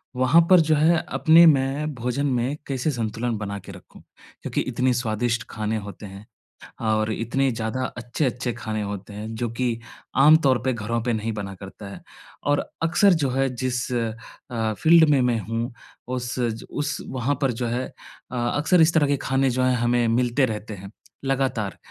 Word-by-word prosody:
वहाँ 130 +7 +5
पर 185 - +8
जो 155 -1 +3
है 160 +2 +3
अपने 165 +1 +6
मैं 145 +1 +2
भोजन 125 +4 -2
में 130 0 0
कैसे 135 +2 -1
संतुलन 115 -1 -2
बना 100 -1 -5
के 95 - -11
रखूँ? 90 -1 -14 0.4
क्योंकि - - -2
इतनी 125 0 0
स्वादिष्ट 120 -1 -1
खाने 110 0 -2
होते 100 0 -8
हैं 100 +1 -10 0.6
और 110 -1 +1
इतने 130 +5 0
ज़्यादा 115 +2 -3
अच्छे-अच्छे 120 0 -2
खाने 110 -1 -4
होते 100 0 -6
हैं 110 +2 -6
जो 120 +1 -2
कि 115 -1 -1 0.4
आमतौर 145 -3 +6
पे 130 - +2
घरों 115 +1 -2
पे 120 - 0
नहीं 110 +1 -2
बना 100 -2 -5
करता 100 +2 -10
है। - - -10 0.4
और 145 0 +2 0.2
अक्सर 190 +4 +4
जो 135 - +1
है 135 +1 +1
जिस 125 0 -2
अ, 115 -1 -4
फ़ील्ड 160 +5 +5
में 140 -3 +4
मैं 120 -2 +1
हूँ 115 +3 -3 0.4
उस 125 0 -4
ज 115 -2 -2
उस 145 0 -2
वहाँ 130 +2 -1
पर 135 -2 +2
जो 120 +1 -3
है 120 +2 -2 0.5
अ - - -5 0.2
अक्सर 160 +4 +3
इस 160 +1 +5
तरह 150 -3 +3
के 140 0 +1
खाने 135 0 +1
जो 130 +1 0
हैं 130 0 +3
हमें 120 0 +2
मिलते 125 +3 +2
रहते 110 -2 -5
हैं 100 +1 -10 0.3
लगातार। 130 -7 -1
120 Hz, 180 wpm, -24 LUFS, 110-135 Hz, 0.6 s, पर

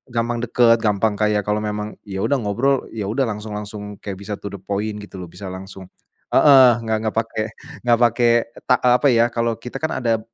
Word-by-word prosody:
gampang 120 +1 0
deket, 120 -1 +4
gampang 105 0 +1
kayak 105 -1 +2
kalau 105 +1 0
memang 105 0 -4
ya 95 -2 -6
udah 140 +8 +1
ngobrol 120 +7 +1 0.2
ya 105 -3 -4
udah 120 +6 0
langsung 105 0 -6
langsung 105 0 -6 0.2
kayak 100 -2 -5
bisa 105 - -3
to 100 - -6
the 100 - -8
point 105 +3 -3
gitu 100 - -12
loh. 90 - -7
Bisa 95 +2 -9
langsung 95 0 -9 0.5
heeh, 135 -3 +8 0.2
nggak 110 -1 0
nggak 110 -1 -3
pake 115 -1 -4 0.5
nggak 120 -1 +4
pake 120 +1 +3 0.4
ta 125 - +5
eee, 125 -1 +5
apa 145 - +3
ya, 115 -3 +4
kalau 115 -1 0
kita 125 +4 -8
kan 155 -5 -3
ada, 115 -2 +2
110 Hz, 210 wpm, -21 LUFS, 105-120 Hz, 0.5 s, heeh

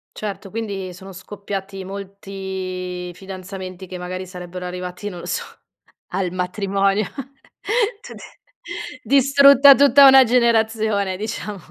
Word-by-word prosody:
Certo, 200 -2 -6
quindi 200 -4 -5
sono 190 +2 -11
scoppiati 195 0 -7
molti 190 -2 -6
fidanzamenti 185 0 -8
che 185 0 -8
magari 185 +1 -5
sarebbero 180 0 -8
arrivati 180 +2 -6
non 180 -3 -9
lo - - -9
so, - - -2 0.7
al 185 -1 -2
matrimonio, 195 +2 0 1.0
tut 485 - -11 0.8
distrutta 280 0 +7
tutta 280 0 +6
una 265 0 +8
generazione 220 -5 +1
diciamo. 210 0 -5
195 Hz, 110 wpm, -21 LUFS, 185-215 Hz, 1.0 s, una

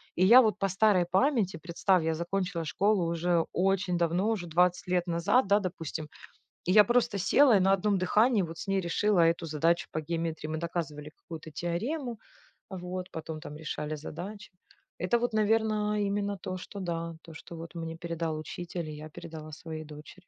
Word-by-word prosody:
и 180 - +2
я 240 +6 +9
вот 215 -3 +1
по 195 - +1
старой 190 -1 +3
памяти, 190 - +2
представь, 170 +2 +1
я 160 0 +1
закончила 175 +1 -2
школу 200 +3 +2
уже 170 0 +1
очень 190 0 +1
давно, 175 +5 +1
уже 215 -6 -1
20 175 +2 +2
лет 180 0 +1
назад, 190 +8 +2
да, 200 +1 +4
допустим, 165 -5 -5 0.6
и 180 - +1
я 210 +2 +8
просто 240 -1 +2
села 230 +5 +5
и - - +3
на 190 +1 +3
одном 195 +1 +2
дыхании 210 +4 +3
вот 165 -1 -7
с - - -6
ней 195 0 +1
решила 190 +2 +2
эту 165 0 +2
задачу 165 +3 +1
по 155 - -2
геометрии. 165 -1 -3
Мы 155 0 -3
доказывали 160 -3 -4
какую-то 160 -1 -9
теорему, 230 - -3 0.5
вот, 185 -1 -5
потом 160 -1 -6
там 150 - -8
решали 155 -1 -4
задачи. 180 +7 -8 0.5
Это 185 +7 +2
вот, 240 -1 -1
наверное, 215 -1 +1
именно 200 0 -1
то, 185 0 -5
что, 200 +2 -9
да, 170 -2 -3
то 165 - -12
что 165 +2 -10
вот 165 0 -9
мне 165 -1 -5
передал 165 -2 -3
учитель 170 +2 -6
и - - -6
я 155 +1 -9
передала 155 0 -9
своей 155 0 -7
дочери. 150 +5 -13
175 Hz, 185 wpm, -29 LUFS, 165-200 Hz, 0.6 s, я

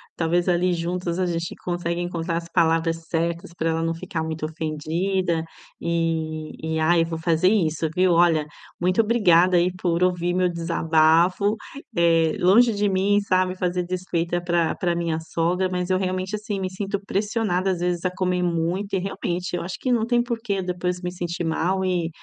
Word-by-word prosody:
talvez 175 +2 +1
ali 180 +1 +2
juntos 175 0 -2
a 185 - +2
gente 170 -1 -3
consegue 175 -1 -2
encontrar 170 -1 -3
as 170 0 -6
palavras 165 0 +1
certas 170 0 -2
pra 165 -1 -1
ela 165 0 0
não 165 - 0
ficar 165 -1 -4
muito 160 -1 -4
ofendida 165 +3 -1 0.3
e 165 -1 0 0.3
e 160 0 -2
ai, 165 +2 +4
eu - - -2
vou 165 0 -4
fazer 165 +2 +2
isso, 165 -6 +1
viu. 185 0 +3
Olha, 165 -3 +4 0.4
muito 185 +3 +1
obrigada 185 -6 +4
aí 175 +1 +3
por 175 -1 0
ouvir 175 -1 +1
meu 180 0 +2
desabafo, 170 +4 +2 0.4
eh, 165 -2 +3
longe 220 +6 +5
de 205 0 +1
mim 200 +2 +2
sabe, 185 -2 +1
fazer 180 -1 -1
desfeita 175 -1 -2
pra 170 -2 +1
pra 175 -2 -1
minha 165 -2 -1
sogra, 170 +3 0
mas 180 0 -2
eu 185 - +3
realmente, 185 +2 -2
assim, 210 -1 -4
me 185 - -2
sinto 195 +1 -3
pressionada, 200 -2 0
às 180 - -2
vezes 175 -1 -1
a 185 - 0
comer 180 -1 -1
muito 175 +4 -1
e - - +1
realmente 180 -1 -3
eu 175 - -2
acho 175 +2 -5
que 255 - -1
não 230 -2 +2
tem 240 0 +2
por 240 -1 -3
quê 200 -4 -1
depois 180 0 -2
me 180 0 -3
sentir 175 -1 -4
mal 185 +4 0
e, 175 -3 0
175 Hz, 185 wpm, -23 LUFS, 165-185 Hz, 0.4 s, longe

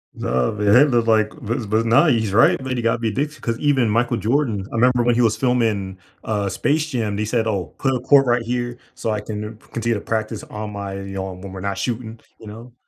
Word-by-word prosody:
No, 65 -1 0
man, 105 0 +3
it 145 +3 +6
looked 120 -2 +1
like 110 -1 +3
but 115 -3 -3
but 110 +1 +1
now 115 +9 +5
he's 110 -7 +1
right. 110 - +5
But 130 -1 -3
he 120 - -2
got 115 +1 +1
me 115 - 0
addicted, 145 +7 -3
'cause 115 -1 -2
even 135 -6 +2
Michael 120 +2 +1
Jordan 115 -5 0
I - - -5
remember 125 +1 +3
when 120 - +3
he 120 - +2
was 110 -2 +2
filming 110 -7 0 0.3
uh 100 -3 -1
Space 145 +11 0
Jam, 115 -7 -2
they 105 - -1
said, 110 +1 0
"Oh, 100 -6 -3
put 135 -1 0
a 125 - -1
court 135 +2 +5
right 120 -1 +2
here 120 +1 -3 0.2
so 110 - -2
I 105 -1 -2
can 105 +1 -6
continue 115 0 -1
to 105 - -3
practice 110 -1 -3
on 105 0 -7
my 100 -1 -5
you 95 0 -7
know, 95 -1 -4
when 95 +1 -9
we're 95 - -7
not 100 +1 -3
shooting," 115 -2 -4 0.2
you 110 - -12
know? 115 +3 -10
115 Hz, 240 wpm, -21 LUFS, 105-120 Hz, 0.3 s, it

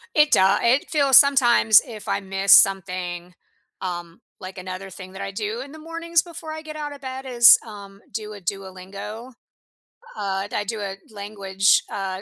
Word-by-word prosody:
It 300 -1 +4
doe 190 +1 +4
it 250 +4 +1
feels 280 -4 +5
sometimes, 245 -6 +5
if 220 -4 -10
I - - -1
miss 195 0 -1
something, 180 -2 +2 0.5
um, 175 -2 -6 0.2
like, 185 0 -10
another 185 +1 -7
thing 185 0 -11
that 195 - -9
I 195 0 -5
do 215 +4 -4
in 275 +1 -10
the 315 - -12
mornings 330 +1 -1
before 330 -2 -10
I 315 - -7
get 310 -1 -10
out 295 -1 -6
of 285 - -14
bed 260 0 -7
is, 240 -3 +7
um, 200 -3 -12
do 215 0 -6
a 205 - -11
Duolingo? 195 +5 -8 0.8
Uh, 195 -1 -3
du - - -9
I 205 - -1
do 215 +2 -5
a 195 -1 -5 0.2
language, 200 -2 0
uh, 190 -1 -5
205 Hz, 180 wpm, -22 LUFS, 190-260 Hz, 0.8 s, is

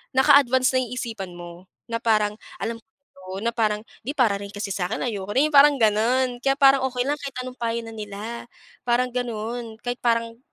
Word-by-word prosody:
naka-advance 260 -1 +5
na 260 - +3
yung 245 -1 -5
isipan 215 -7 -5
mo, 175 +2 -11 0.2
na 230 - -1
parang 215 -3 +2 0.3
alam 230 0 -2
ko, 190 -6 -12
na 235 +1 -1
parang, 210 -2 +1 0.2
"'Di, 270 - -2
para 230 -7 +3
rin 200 - -7
kasi 205 0 -5
sa 180 -2 -1
akin, 225 - -2
ayoko 205 -4 -4
na," - - +6
yung 310 - -8
parang 285 +1 +8
gano'n, 240 +4 +2
kaya 270 0 +3
parang 275 -1 +6
okey 250 -1 -1
lang 290 +1 0
kahit 280 -2 -6
anong 255 0 -9
payo 230 0 -1
na 225 - -9
nila, 215 +2 -7 0.4
parang 245 +1 +2
ganun. 235 -1 -4
Kahit 245 0 -3
parang, 230 -1 0
230 Hz, 200 wpm, -24 LUFS, 210-255 Hz, 0.4 s, parang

